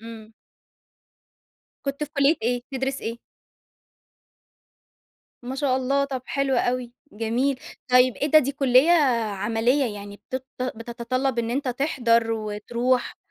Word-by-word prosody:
امم. 225 -1 -11 1.5
كنت 280 +2 -2
في 290 - -14
كلية 280 +3 +4
إيه، 245 +1 0
بتدرس 265 +1 -2
إيه؟ 230 +1 -5 2.2
ما 255 +2 -5
شاء 270 -2 +1
الله! 275 +2 +1
طب 265 -2 -4
حلو 275 -1 0
أوي 245 0 -1 0.2
جميل، 235 +5 0 0.3
طيّب 250 -1 +5
إيه 290 - -1
ده 310 - +8
دي 280 -2 0
كلية 270 +3 +4 0.4
عمليّة 230 +4 +1
يعني 205 0 -9
بتط 255 +5 -6 0.2
بتتطلب 240 +2 -2
إن 230 -1 -1
أنت 265 +2 -1
تحضر 240 -4 +1
وتروح. 235 +4 -1
250 Hz, 120 wpm, -24 LUFS, 230-275 Hz, 2.2 s, ده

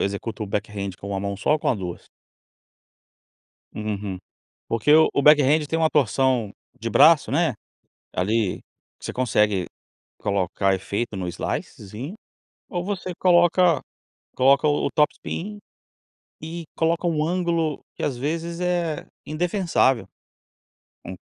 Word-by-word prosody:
executo 100 +2 -3
o - - -3
backhand 100 0 -3
com 100 - -8
1 100 -1 -2
mão 100 0 -3
só 100 - +1
ou 155 - +2
com - - -1
a - - +3
2? 90 -4 -6 1.7
Hum, - - -5
hum, 100 - -6 0.2
hum, - - -10 0.5
porque 115 +5 +1
o 160 +1 +7
o - - +2
backhand 150 +1 +5
tem 160 - -1
um 160 - +4
torção 130 -4 +1 0.3
de 115 - -3
braço, 145 -2 +5
né, 160 -2 +2 0.6
ali, 105 +2 0 0.4
você - - -5
consegue 105 -6 +1 0.5
colocar 95 0 0
efeito 100 +4 -3
no 95 -2 -3
slicezinho 105 - -5 0.5
ou 175 -1 -3
você 190 -2 -4
coloca 175 -3 +4 0.6
coloca 140 +3 +4
o 145 - +1
o - - -3
topspin 190 +6 -1 0.8
e 165 +1 -6
coloca 165 +2 +1
um 155 -2 +1
ângulo 170 -3 0 0.2
que - - -6
as 135 - -1
vezes 165 +5 -3
é 175 -3 -1 0.2
indefensável, 165 - +1 1.0
um 95 - -6
145 Hz, 135 wpm, -23 LUFS, 105-165 Hz, 1.7 s, o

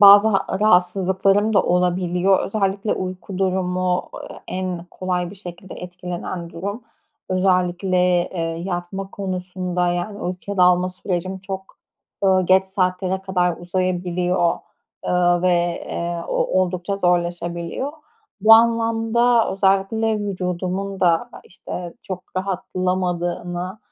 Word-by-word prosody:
bazı 205 +1 +9
ha 195 -3 +1
rahatsızlıklarım 195 +1 +3
da 205 - +4
olabiliyor. 180 +1 +2
Özellikle 200 0 0
uyku 185 0 -5
durumu, 185 -1 0
ııı, - - -8
en 185 -2 -3
kolay 180 -1 -2
bir - - -10
şekilde 180 -1 -9
etkilenen 180 -1 -6
durum. 200 +8 -5 0.5
Özellikle, 185 0 +1 0.3
eee, 180 - -4
yatma 175 +3 -4
konusunda 180 -2 -2
yani 175 +4 -2
uykuya 185 +1 -4
dalma 180 0 +4
sürecim 185 0 -3
çok, 190 0 -7 0.5
ııı, 185 -1 +4
geç 190 +1 +5
saatlere 190 0 -1
kadar 180 -3 +1
uzayabiliyor, 180 0 0 0.5
ııı, 175 -1 +3
ve, 185 - +3 0.4
eee, 170 0 -3
o 185 - +1
oldukça 185 +1 -1
zorlaşabiliyor. 175 - -1 0.5
Bu 215 +3 +7
anlamda 230 +1 +3
özellikle 195 +3 +2
vücudumun 190 0 -3
da, 170 -2 +2
işte, 175 -1 -7
çok 185 -2 -6
rahatlamadığını 180 -1 -2
185 Hz, 110 wpm, -21 LUFS, 180-195 Hz, 0.5 s, bazı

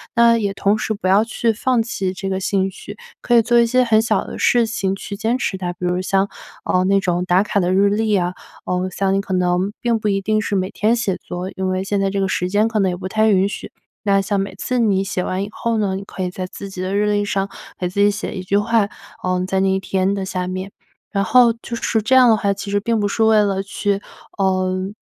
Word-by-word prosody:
那 235 0 +5
也 200 -3 -1
同 200 +2 +1
时 220 - -2
不 200 -3 -4
要 195 +3 +5
去 230 0 0
放 245 +2 +1
弃 195 -5 -2
这 190 +1 -5
个 190 0 -1
兴 190 0 0
趣， 205 +2 -10 0.2
可 240 - 0
以 - - +7
做 240 +2 +2
一 235 - +5
些 255 +2 +3
很 220 -2 +4
小 220 -2 0
的 - - -7
事 240 -2 +3
情 195 -4 -1
去 200 +1 -7
坚 225 +4 0
持 215 - -2
它。 180 -1 -3
比 180 - -6
如 180 +1 0
像， 195 +1 +1 0.4
嗯， 185 0 +2
那 195 0 +4
种 180 -2 0
打 180 +1 +3
卡 210 -1 0
的 180 -1 +1
日 200 +1 +4
历 215 +2 0
呀， 180 -3 +1 0.4
嗯， 180 +1 0
像 195 +1 0
你 195 - +1
可 195 - -5
能 180 +1 +1
并 235 -2 +1
不 215 - -2
一 195 -1 +1
定 215 +2 +1
是 205 - -2
每 185 -1 0
天 215 +2 +1
写 220 -6 -1
作， 180 +1 -6
因 190 0 -2
为 185 0 -1
现 200 0 -1
在 195 - +1
这 200 0 -2
个 195 - +1
时 180 -1 -1
间 210 +3 +2
可 225 -1 -1
能 195 -2 +2
也 180 - -4
不 185 - -5
太 220 +3 +2
允 195 -1 +3
许， 200 - -7 0.3
那 200 -2 +3
像 200 +1 -1
每 195 -1 -3
次 250 +6 -2
你 200 -4 +2
写 185 -2 -2
完 185 +1 -2
以 205 - -6
后 230 +1 -2
呢， 200 -3 0
你 195 - -5
可 190 -1 -6
以 180 - -1
在 185 0 -5
自 200 +2 -8
己 190 -1 -7
的 185 +2 -2
日 210 +1 +2
历 205 0 +1
上 195 -1 -1 0.3
给 180 - -1
自 190 +3 -4
己 205 - +5
写 205 0 -4
一 185 - -5
句 195 +2 +1
话， 210 0 +2 0.3
嗯， 185 0 0
在 190 +1 0
那 190 0 +2
一 190 0 +1
天 190 0 0
的 195 -1 -3
下 185 -1 -3
面。 185 +2 -5 0.4
然 200 -1 0
后 240 +3 +5
就 235 - -5
是 225 -1 0
这 230 +5 0
样 260 -1 +7
的 225 - +6
话， 200 -2 0
其 200 +1 -7
实 205 - +2
并 230 +1 0
不 205 - +1
是 220 +2 0
为 220 -1 +5
了 195 -1 0
去， 200 0 -2 0.4
嗯， 185 0 0
195 Hz, 285 characters per minute, -20 LUFS, 190-215 Hz, 0.4 s, 以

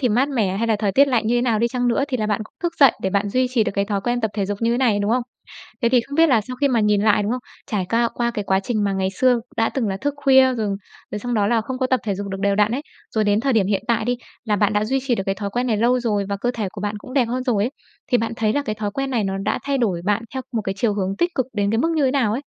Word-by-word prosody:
thì 250 - +2
mát 250 +6 +2
mẻ, 215 -9 0
hay 230 +3 0
là 225 -2 +2
thời 205 -2 0
tiết 280 +4 +5
lạnh 235 -4 +1
như 235 - +2
thế - - 0
nào 230 -4 +1
đi 235 - +2
chăng 245 0 0
nữa 260 +4 +2
thì 255 - -1
là 215 -3 -1
bạn 210 0 0
cũng - - -19
thức 345 -1 0
dậy 275 -4 +8
để 190 - 0
bạn 200 +1 0
duy 255 +5 +1
trì 240 -4 +2
được - - -2
cái 200 0 +1
thói 200 -1 -2
quen 240 +3 -1
tập 220 - -1
thể 200 -3 -1
dục 205 0 -3
như 230 +1 +2
thế 240 - 0
này, 230 -6 +2
đúng 205 +2 0
không? 250 +1 +2 0.6
Thế 235 - +4
thì 245 0 +4
không 280 +4 -8
biết 330 0 +5
là 240 -6 +4
sau 250 +4 -7
khi 280 +2 +2
mà 240 -4 +2
nhìn 210 -1 +2
lại, 210 -1 +3
đúng 210 +4 -1
không? 255 - -2 0.3
Trải 195 -4 -1
ca 230 0 +2
qua 235 0 -1
cái 210 -3 -4
quá 190 0 +2
trình 215 0 -1
mà 200 - 0
ngày 190 -1 0
xưa 245 +4 +2 0.2
đã 225 -1 +2
từng 245 -6 -2
là 195 - -2
thức 285 +6 -2
khuya 265 -1 +6
rồi, 220 -3 -1 0.4
rồi 210 - -3
xong 245 +3 -3
đó 205 -2 +2
là 230 0 +2
không 255 +4 -5
có 260 - +1
tập 255 -1 +1
thể 205 -3 -1
dục 200 +1 -5
được 195 0 -5
đều 200 0 +2
đặn 210 +2 +2
ấy, 275 +4 -2 0.3
rồi 215 -1 +2
đến 205 +1 +2
thời 270 +3 +1
điểm 215 -5 +3
hiện 200 -1 0
tại 230 -2 +1
đi, 245 +1 0 0.3
là 210 -2 +1
bạn 205 +1 +2
đã 210 +1 +1
duy 265 +4 0
trì 250 - +2
được 195 - -2
cái 195 - 0
thói 200 0 -4
quen 245 +4 -1
này 225 -3 +1
lâu 245 +4 +2
rồi 210 -4 0
và 200 - -1
cơ 245 - +1
thể 215 -4 -2
của 205 - -8
bạn 205 +1 -2
cũng 255 +4 -11
đẹp 265 -4 +4
hơn 250 +2 -2
rồi 220 -6 +1
ấy, 245 - -1 0.4
thì 245 - +5
bạn 225 0 -2
thấy 215 -1 +1
là 285 - 0
cái 215 -5 -3
thói 210 -1 -3
quen 275 +5 -3
này 230 -5 0
nó 195 0 -2
đã 200 - 0
thay 280 -1 0
đổi 195 -9 0
bạn 210 +3 +1
theo 260 - -3
một 225 -3 -1
cái 195 0 -3
chiều 210 -1 +1
hướng 195 -1 -2
tích 345 - 0
cực 260 -2 0
đến 205 -2 0
cái 225 - +1
mức 325 +7 +1
như 295 - +2
thế 260 - +3
nào 250 -7 +1
ấy? 245 - -1
225 Hz, 350 wpm, -21 LUFS, 205-250 Hz, 0.6 s, dậy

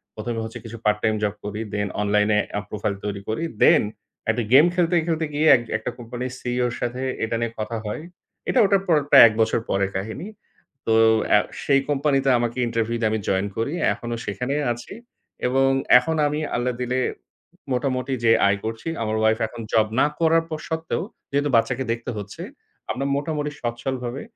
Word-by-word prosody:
১ম 115 +2 -4
এ - - -1
হচ্ছে 115 - -7
কিছু 115 +1 -8
পার্ট 105 0 +3
টাইম 110 -1 +2
জব 105 0 0
করি 105 +1 -4
then 105 0 -1
অনলাইন 105 0 +2 0.3
এপ 105 - -4
প্রোফাইল 105 -1 -2
তৈরি 100 -1 -3
করি। 110 +9 -2 0.2
Then - - +6 0.5
একটা 115 +1 +1
গেম 145 +4 +8
খেলতে, 175 -1 +2
খেলতে 160 -1 0
গিয়ে 155 +2 +2
এক 120 - 0 0.2
একটা - - -5
কোম্পানির 120 +2 -5
সিইও 125 0 -1
এর 120 - -6
সাথে 125 +2 -2 0.2
এটা 115 +1 -1
নিয়ে 115 -1 -1
কথা 110 +2 -3
হয়। 105 +8 -4 0.5
এটা 255 - +3
ওটার 195 -1 +3
পর 165 - +4
প্রায় - - +10
১ 110 - -1
বছর 110 +1 +2
পরের 100 0 0
কাহিনী। 110 - -5 0.6
তো 115 - +3 0.4
আ - - +5 0.2
সেই 140 -1 +3
কোম্পানিতে 135 -1 +2
আমাকে 120 +1 -2
ইন্টারভিউ 115 0 -1
দিয়ে 110 - +2
আমি 110 - 0
জয়েন 95 +1 +1
করি। 115 +7 -1 0.2
এখনো 120 -1 -5
সেখানেই 125 +9 -2
আছি 120 +8 -10 0.5
এবং 135 +1 +3 0.3
এখন 160 +6 -2
আমি 150 +1 -2 0.2
আল্লাহ 125 +1 0
দিলে 125 +1 0 0.7
মোটামুটি 130 0 -1
যে 115 - +6 0.2
আয় 100 - +2
করছি, 110 +6 -5 0.2
আমার 110 0 -1
ওয়াইফ 110 +1 +2
এখন 115 +1 -9
জব 110 -1 +4
না - - +5
করার 165 0 +3
পর 155 -1 -4
সত্ত্বেও, 160 0 -2 0.3
যেহেতু 145 +1 +1
বাচ্চাকে 125 +3 +2
দেখতে 120 +2 -3
হচ্ছে 105 - -7 0.5
আমরা 135 +2 -3
মোটামুটি 150 0 -2
সচ্ছলভাবে 125 +2 -3
120 Hz, 185 wpm, -23 LUFS, 110-140 Hz, 0.7 s, প্রায়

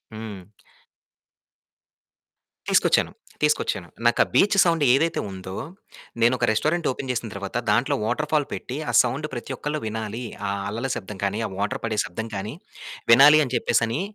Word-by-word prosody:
హ్మ్. 110 -4 -7 2.3
తీసుకొచ్చాను. - - +3 0.3
తీసుకొచ్చాను. 125 - 0 0.2
నాకా 120 - +4
బీచ్ 200 +8 +4
సౌండ్ 165 -3 +1
ఏదైతే 160 +5 +2
ఉందో 95 0 -8 0.7
నేనొక 120 +1 +3
రెస్టారెంట్ 155 +9 0
ఓపెన్ 130 +1 -5
చేసిన 120 -2 -2
తర్వాత 100 -1 -6
దాంట్లో 120 +5 +2
వాటర్ 150 +6 -1
ఫాల్ 150 -2 +2
పెట్టి 130 - -5
ఆ - - -2
సౌండ్ 130 +5 -3
ప్రతి 125 +2 -5
ఒక్కళ్ళు 150 +3 -3
వినాలి. 110 +2 -4 0.3
ఆ - - -1 0.2
అల్లల 115 +6 -3
శబ్దం 100 0 -7
కానీ, 100 +2 -1
ఆ - - -5
వాటర్ 100 +1 -2
పడే 110 -2 -1
శబ్దం 110 +6 -5
కాని 105 +7 -5 0.6
వినాలి 145 +5 +8
అని 130 - -6
చెప్పేసని 115 +4 +1
120 Hz, 145 wpm, -24 LUFS, 105-145 Hz, 2.3 s, వినాలి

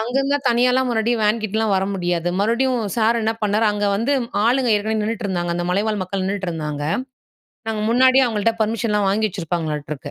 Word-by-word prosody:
அங்கேருந்துலாம் 270 +4 -1
தனியாலாம் 250 +2 +2
மறுபடியும் 230 0 0
வேன்கிட்டலாம் 220 0 0
வர 190 - +1
முடியாது. 175 -2 -1
மறுபடியும் 240 +3 +1 0.2
சார் 230 +1 +2
என்ன 225 +1 0
பண்ணாரு 210 +2 +2
அங்க 205 0 -1
வந்து 235 +7 0 0.3
ஆளுங்க 245 +1 +2
ஏற்கனவே 220 +1 -1
நின்னுட்ருந்தாங்க. 195 -6 -2
அந்த 175 - -2
மலைவாழ் 210 +2 0
மக்கள் 190 +1 -3
நின்னுட்டு 195 -1 -2
இருந்தாங்க. 150 -3 -4 0.9
நாங்க 215 -1 -2
முன்னாடியே 260 +2 +5
அவங்கள்ட்ட 225 0 0
பர்மிஷன்லாம் 210 -2 0
வாங்கி 215 +2 +1
வச்சிருப்பாங்களாட்டுருக்கு. 155 -5 -4
215 Hz, 155 wpm, -20 LUFS, 190-235 Hz, 0.9 s, முன்னாடியே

